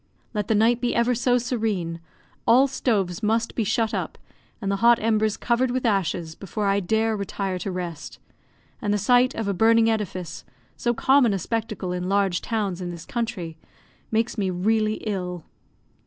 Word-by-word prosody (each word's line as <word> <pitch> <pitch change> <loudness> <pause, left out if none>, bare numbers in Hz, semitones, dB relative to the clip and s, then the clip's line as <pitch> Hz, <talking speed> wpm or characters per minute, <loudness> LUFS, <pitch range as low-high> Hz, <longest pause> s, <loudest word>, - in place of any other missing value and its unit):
Let 210 -2 -2
the 220 - +2
night 230 +3 +3
be 245 - 0
ever 235 +1 +3
so 245 +1 +2
serene, 215 -9 -2 0.5
all 260 +4 +6
stoves 215 -9 -1
must 225 +2 0
be 230 - 0
shut 220 +2 0
up, - - -3 0.4
and 200 -3 -2
the 200 - 0
hot 235 +2 +5
embers 215 -1 +1
covered 245 +2 +1
with 255 +1 -1
ashes, 175 -6 0
before 205 +4 -4
I 200 0 +3
dare 220 +3 +1
retire 195 -2 -3
to 195 - -3
rest; 175 -4 -6 0.6
and 205 -4 0
the 210 - +2
sight 245 +5 +3
of 225 -2 -3
a 200 - +1
burning 225 +3 +4
edifice, 185 -6 -4 0.3
so 240 0 0
common 260 -4 +4
a - - 0
spectacle 215 -2 -3
in 180 0 -3
large 195 -3 +1
towns 200 -5 -2
in 175 - -4
this 170 -1 -8
country, 180 -9 -4 0.5
makes 225 +1 0
me 195 -2 0
really 215 +4 +1
ill. 180 -5 -3
215 Hz, 175 wpm, -24 LUFS, 185-230 Hz, 0.6 s, all